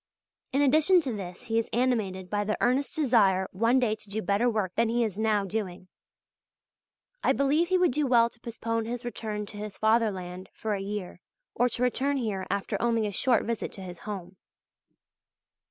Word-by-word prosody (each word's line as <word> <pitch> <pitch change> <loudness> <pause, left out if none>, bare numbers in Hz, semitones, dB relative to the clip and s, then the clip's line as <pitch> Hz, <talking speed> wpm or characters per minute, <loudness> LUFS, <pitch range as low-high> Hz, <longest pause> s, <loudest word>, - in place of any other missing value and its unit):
In 275 +2 +2
addition 310 +6 +5
to 265 -6 -3
this 180 -2 -7
he 225 -2 +1
is 230 - -3
animated 220 -7 0
by 205 +2 -1
the 215 +1 -1
earnest 265 +7 +1
desire 210 - +3
one 230 +6 +2
day 245 -4 +2
to 210 -1 -14
do 210 +2 -2
better 200 +6 +2
work 210 -5 -1
than 230 0 +2
he 240 +1 +2
is 215 -5 -2
now 215 -1 +1
doing. 185 -3 -4 1.3
I - - +4
believe 290 +5 +2
he 370 +1 +3
would 360 -4 +3
do 290 +2 0
well 235 -2 +5
to 235 - -15
postpone 230 -1 -3
his 240 +1 -5
return 215 -3 -4
to 205 - -10
his 205 -2 -6
Fatherland 195 -5 0
for 220 -1 -3
a 195 - -2
year, 195 -3 -5 0.3
or 245 +1 +2
to 245 - -2
return 275 +3 +1
here 210 -7 -2
after 200 0 -2
only 230 -2 +2
a 205 - -2
short 240 +4 +2
visit 230 -1 -3
to 195 - -9
his 180 -2 -8
home. 190 -3 -7
220 Hz, 190 wpm, -28 LUFS, 200-245 Hz, 1.3 s, addition